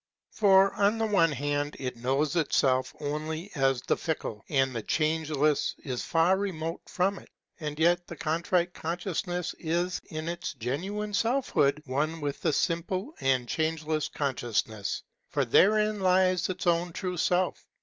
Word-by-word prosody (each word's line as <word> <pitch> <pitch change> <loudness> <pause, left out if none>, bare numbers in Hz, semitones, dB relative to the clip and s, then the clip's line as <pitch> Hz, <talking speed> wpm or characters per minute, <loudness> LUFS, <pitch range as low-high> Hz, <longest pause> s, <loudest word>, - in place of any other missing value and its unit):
For 195 -2 +5
on 205 +2 +2
the 225 - +1
one 195 -7 +3
hand 145 +1 -1
it 125 -2 -4
knows 135 +6 0
itself 130 -5 +2
only 155 +5 -4
as 135 -3 +1
the - - +1
fickle; 130 - -4
and 135 -3 +1
the 115 - -2
changeless 155 0 +1
is 130 -4 -4
far 170 +3 +3
remote 170 -4 -3
from 190 +2 0
it. - - -18 0.3
And 150 -2 -4
yet 175 +2 +3
the 170 - -7
Contrite 170 +3 0
Consciousness 175 +1 -3
is 175 +2 -1
in 155 0 -5
its 170 -2 -3
genuine 190 - -3
selfhood 205 - +1
one 150 +5 -1
with 145 -2 -3
the 160 - +2
simple 180 - -1
and 130 -2 +2
Changeless 155 0 -1
Consciousness; 120 -8 -2 0.3
for 140 -2 0
therein 210 - +4
lies 185 -1 +3
its 185 0 -4
own 175 0 +1
true 180 0 -3
Self. 180 +2 +1
160 Hz, 150 wpm, -28 LUFS, 145-180 Hz, 0.3 s, For